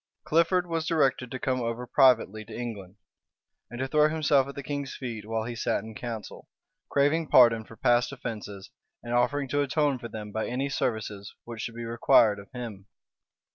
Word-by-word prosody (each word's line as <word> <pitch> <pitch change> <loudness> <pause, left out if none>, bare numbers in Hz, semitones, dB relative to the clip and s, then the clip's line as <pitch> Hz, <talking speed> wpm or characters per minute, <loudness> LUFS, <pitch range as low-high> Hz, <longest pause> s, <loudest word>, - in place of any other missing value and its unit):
Clifford 170 +3 +2
was 165 -2 -2
directed 135 -6 +1
to 130 - -4
come 130 0 -1
over 115 +1 -3
privately 120 -5 +3
to - - -9
England, 105 -6 -6 0.7
and 120 - -8
to 130 - -1
throw 150 +2 +4
himself 145 -4 +2
at 140 - -8
the 140 - -6
king's 140 -1 -4
feet 115 -5 -6
while 110 0 -1
he 120 +1 -5
sat 115 -3 -1
in 110 0 -9
council; 115 -1 -7 0.4
craving 150 +3 +2
pardon 115 -4 +6
for 115 - -13
past 120 +2 +2
offences 105 -6 -7 0.3
and 120 0 -4
offering 140 +3 +1
to 145 +2 +1
atone 145 -1 +1
for 120 - -6
them 105 -2 -7
by 110 +1 -2
any 135 +3 -2
services 110 -6 -3
which 115 -2 -7
should 115 - -5
be 120 0 -5
required 115 -2 +4
of 100 - -13
him. 115 -6 -7
120 Hz, 185 wpm, -27 LUFS, 110-140 Hz, 0.7 s, pardon